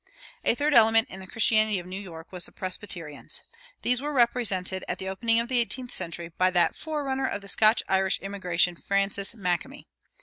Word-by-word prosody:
A -, -, +2 dB
third 295 Hz, +3 st, +1 dB
element 225 Hz, 0 st, +6 dB
in 190 Hz, -, -8 dB
the 190 Hz, -, -9 dB
early -, -, -15 dB
Christianity 215 Hz, -2 st, +3 dB
of 175 Hz, -, -6 dB
New 185 Hz, +2 st, -6 dB
York 165 Hz, -4 st, -11 dB
was 180 Hz, -2 st, -3 dB
the -, -, -15 dB
Presbyterians. 180 Hz, -5 st, -3 dB, 0.4 s
These 250 Hz, +1 st, +1 dB
were 295 Hz, +1 st, -3 dB
represented, 220 Hz, -7 st, +1 dB
at 180 Hz, -, -2 dB
the 190 Hz, -, -6 dB
opening 230 Hz, +4 st, +1 dB
of 235 Hz, -, 0 dB
the 250 Hz, -1 st, +1 dB
eighteenth 245 Hz, +1 st, -3 dB
century, 170 Hz, -2 st, -5 dB
by 185 Hz, 0 st, +5 dB
that 175 Hz, -1 st, +3 dB
forerunner 280 Hz, -4 st, -2 dB
of 200 Hz, -, -3 dB
the 200 Hz, -, -12 dB
Scotch 215 Hz, +2 st, +5 dB
Irish 190 Hz, 0 st, +2 dB
immigration, 180 Hz, -3 st, 0 dB
Francis 195 Hz, +3 st, -1 dB
Makemie. 200 Hz, +8 st, -2 dB
200 Hz, 195 wpm, -26 LUFS, 185-235 Hz, 0.4 s, element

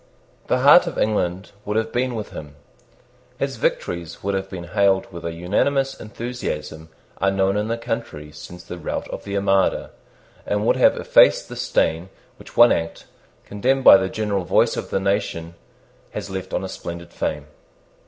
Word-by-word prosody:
The 125 Hz, -, +1 dB
heart 150 Hz, +6 st, +7 dB
of 170 Hz, -, -5 dB
England 95 Hz, -3 st, -1 dB
would 105 Hz, +1 st, -2 dB
have 110 Hz, 0 st, -1 dB
been 125 Hz, 0 st, 0 dB
with 110 Hz, -2 st, -5 dB
him. 75 Hz, -2 st, -9 dB, 0.8 s
His -, -, -3 dB
victories 85 Hz, -1 st, -3 dB
would 100 Hz, +1 st, -1 dB
have 95 Hz, 0 st, -3 dB
been 90 Hz, -3 st, -7 dB
hailed 95 Hz, +2 st, +2 dB
with 85 Hz, -, -8 dB
an 85 Hz, 0 st, -4 dB
unanimous 135 Hz, +11 st, 0 dB
enthusiasm 80 Hz, -10 st, -6 dB, 0.3 s
unknown 95 Hz, 0 st, +2 dB
in 105 Hz, +1 st, -1 dB
the 115 Hz, +1 st, -1 dB
country 115 Hz, -11 st, -5 dB
since 90 Hz, +4 st, -11 dB
the 90 Hz, +1 st, -8 dB
rout -, -, -4 dB
of -, -, -7 dB
the 100 Hz, -, -4 dB
Armada, 95 Hz, -1 st, +1 dB, 0.5 s
and 105 Hz, +1 st, -1 dB
would -, -, +3 dB
have -, -, +4 dB
effaced -, -, +4 dB
the -, -, -7 dB
stain 85 Hz, +3 st, 0 dB, 0.3 s
which -, -, -15 dB
one 120 Hz, 0 st, +8 dB
act, 80 Hz, 0 st, -2 dB, 0.4 s
condemned 130 Hz, +6 st, 0 dB
by -, -, +10 dB
the 95 Hz, 0 st, -1 dB
general 105 Hz, -3 st, -2 dB
voice -, -, +2 dB
of -, -, -5 dB
the -, -, 0 dB
nation, 95 Hz, -4 st, -2 dB, 0.6 s
has 100 Hz, -, -5 dB
left 95 Hz, -1 st, -5 dB
on -, -, -2 dB
his 95 Hz, -, -5 dB
splendid 85 Hz, 0 st, -8 dB
fame. 75 Hz, -1 st, -3 dB
95 Hz, 175 wpm, -22 LUFS, 85-110 Hz, 0.8 s, by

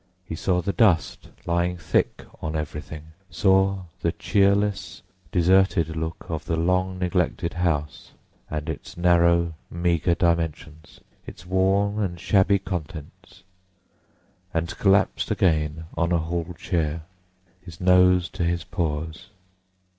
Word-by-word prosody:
He 80 Hz, -, -7 dB
saw 90 Hz, +2 st, 0 dB
the 100 Hz, -, -1 dB
dust 95 Hz, -, +2 dB, 0.2 s
lying 85 Hz, +1 st, 0 dB
thick 80 Hz, -2 st, -1 dB, 0.2 s
on 80 Hz, 0 st, -3 dB
everything, 75 Hz, 0 st, -6 dB, 0.2 s
saw 95 Hz, +2 st, +2 dB, 0.2 s
the -, -, +1 dB
cheerless, 100 Hz, 0 st, 0 dB, 0.3 s
deserted 90 Hz, -2 st, +3 dB
look 80 Hz, +1 st, -4 dB
of 80 Hz, -2 st, -4 dB
the 80 Hz, -, -1 dB
long 90 Hz, +3 st, 0 dB
neglected 90 Hz, -2 st, -1 dB
house, 80 Hz, -4 st, -2 dB, 0.4 s
and 75 Hz, -1 st, -4 dB
its -, -, -7 dB
narrow, 85 Hz, -1 st, +3 dB, 0.2 s
meagre 85 Hz, 0 st, +1 dB
dimensions, 80 Hz, -2 st, -2 dB, 0.3 s
its 90 Hz, -, -11 dB
worn 95 Hz, +3 st, +1 dB
and 90 Hz, -4 st, -2 dB
shabby 100 Hz, +2 st, +3 dB
contents—and 90 Hz, +1 st, -9 dB
collapsed 95 Hz, -2 st, +2 dB
again 80 Hz, -2 st, +1 dB
on 85 Hz, +1 st, 0 dB
a 85 Hz, -, +3 dB
hall 85 Hz, +1 st, -3 dB
chair, 80 Hz, -3 st, -2 dB, 0.6 s
his 85 Hz, -3 st, -12 dB
nose 90 Hz, -1 st, +4 dB
to -, -, -4 dB
his 85 Hz, 0 st, 0 dB
paws. 80 Hz, +1 st, -4 dB
85 Hz, 115 wpm, -24 LUFS, 80-95 Hz, 0.6 s, nose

